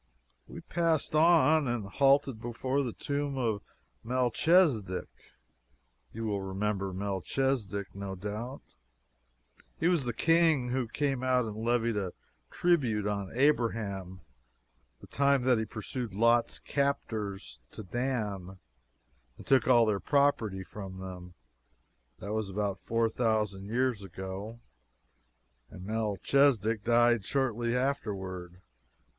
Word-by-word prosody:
We - - -9
passed 165 -4 0
on, 160 -2 +5
and 120 -4 -2
halted 135 +2 +2
before 130 +4 -1
the 125 -4 -2
tomb 140 +2 -3
of 110 -5 0 0.4
Melchisedek! 125 - +2 1.0
You 115 +1 -5
will 100 -2 -1
remember 95 0 -2
Melchisedek, 100 +2 -2
no 100 -1 -5
doubt; 105 +7 -6 1.2
he 165 - +2
was 170 -7 +2
the 120 - 0
King 160 -2 +3
who 125 -1 -1
came 135 +1 -1
out 130 -1 +2
and 110 -2 -5
levied 115 0 0
a 95 -3 -2 0.4
tribute 130 - +1
on 100 -2 -2
Abraham 105 - 0 0.8
the - - -11
time 140 -1 +2
that 125 -2 +3
he 110 - -1
pursued 110 0 -5
Lot's 115 +2 +3
captors 110 -8 -2
to 110 - -8
Dan, 105 -5 -3 0.8
and - - -12
took 130 -3 +3
all 120 -3 +6
their 105 -2 +1
property 120 -10 +1
from 95 -1 -8
them. 90 -1 -9 0.8
That 100 +3 -5
was 110 -2 -2
about 100 0 -2
four 115 0 +2
thousand 110 -4 -1
years 120 -1 0
ago, 95 +4 -7 1.1
and 90 - -10
Melchisedek 110 +1 +1
died 120 -1 +4
shortly 120 0 0
afterward. 95 -9 -3
115 Hz, 115 wpm, -30 LUFS, 100-130 Hz, 1.2 s, all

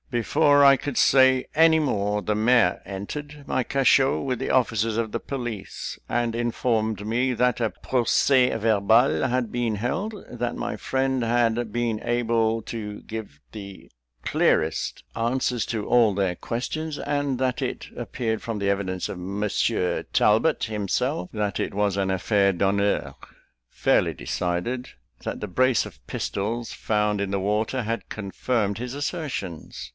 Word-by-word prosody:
Before 140 +4 +4
I 140 0 +8
could 135 0 -5
say 130 -1 +5
more, 145 -11 +3
the 105 0 -1
mayor 110 -4 +3
entered 145 +10 -7
my 130 - 0
cachot 135 +1 +3
with 130 -3 -1
the 135 - -3
officers 115 -3 +1
of 115 -2 -2
the 115 - -2
police, 120 -7 -5
and 120 -1 0
informed 110 -3 -1
me 125 +3 +1
that 125 0 +1
a 115 - +2
procès 125 +1 +2
verbal 110 +4 +3
had 125 -2 -1
been 120 -3 0
held; 180 - -3
that 120 0 -3
my 120 - -3
friend 130 -1 -1
had 115 -1 +1
been 115 -1 -1
able 115 -1 +1
to 105 -3 -6
give 110 -10 -7
the 100 -3 -10 0.4
clearest 80 +1 +1
answers 120 -1 0
to 110 -3 -3
all 115 -4 +4
their 95 -2 0
questions; 145 - -4
and 145 -3 -1
that 130 -1 0
it - - -3
appeared 110 -3 -3
from 115 -2 -4
the 100 0 0
evidence 95 -2 -1
of - - -6
Monsieur 100 -1 -1
Talbot 115 +10 +3
himself, 105 - -1
that 105 -3 -2
it - - -2
was 100 -1 +1
an 95 -1 0
affair 100 +1 +2
d'honneur, 100 +2 0 0.6
fairly - - +2
decided; 90 - -2 0.3
that - - -4
the 105 - -4
brace 130 +6 +2
of - - -13
pistols 115 +3 -3
found 105 -1 0
in 100 -1 -2
the 100 - 0
water 105 +6 0
had 115 +1 -3
confirmed 105 0 -2
his 125 +2 -5
assertions. 135 - -5
115 Hz, 145 wpm, -25 LUFS, 105-125 Hz, 0.6 s, I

